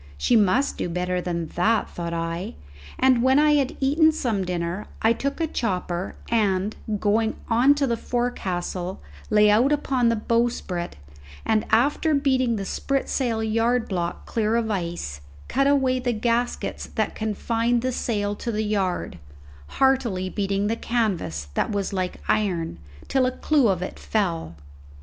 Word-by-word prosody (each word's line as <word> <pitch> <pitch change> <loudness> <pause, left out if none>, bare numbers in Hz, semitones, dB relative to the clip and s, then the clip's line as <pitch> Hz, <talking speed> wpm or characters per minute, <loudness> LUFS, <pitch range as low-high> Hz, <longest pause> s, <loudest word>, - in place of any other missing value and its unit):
She 240 - +2
must 230 +6 +2
do - - -1
better 180 +1 -1
than 170 -2 -2
that, 220 +6 +1
thought 170 -1 -5
I; 165 - -3 0.4
and 260 -2 +4
when 260 +2 +4
I 300 +1 +5
had 280 0 +1
eaten 305 +4 +4
some 235 -10 -1
dinner 180 +2 -3 0.2
I 225 +1 +5
took 280 +5 -3
a 330 - +2
chopper, 185 - -2
and, 205 -3 +1 0.2
going 220 +2 +1
on 245 +5 +5
to 285 -1 +1
the 235 -3 0
forecastle, 190 -7 -3 0.3
lay 210 -1 +5
out 240 +7 +4
upon 265 -5 +2
the 230 - +2
bowsprit, 225 -6 -1 0.5
and 215 -1 +1
after 290 +7 +3
beating 260 -4 +2
the 200 -2 -3
spritsail 250 -2 -1
yard 230 +2 +1
block 175 -3 -3
clear 220 0 0
of 230 -1 0
the - - +1
ice, 170 - -4 0.3
cut 275 +2 +2
away 265 -2 +3
the 250 -1 0
gaskets 235 +2 -1
that 220 -2 -2
confined 230 +2 0
the 255 - 0
sail 205 -4 -1
to 235 - -3
the 215 0 -1
yard, 195 - -1 0.6
heartily 240 -9 +2
beating 200 0 -1
the 220 +2 0
canvas, 185 - -2
that - - 0
was 200 -1 -2
like 185 -1 -2
iron, 175 - 0 0.3
till 265 -2 +2
a - - 0
clew 290 -6 +3
of 185 -3 +1
it - - -6
fell. 170 - -1
220 Hz, 160 wpm, -24 LUFS, 185-250 Hz, 0.6 s, I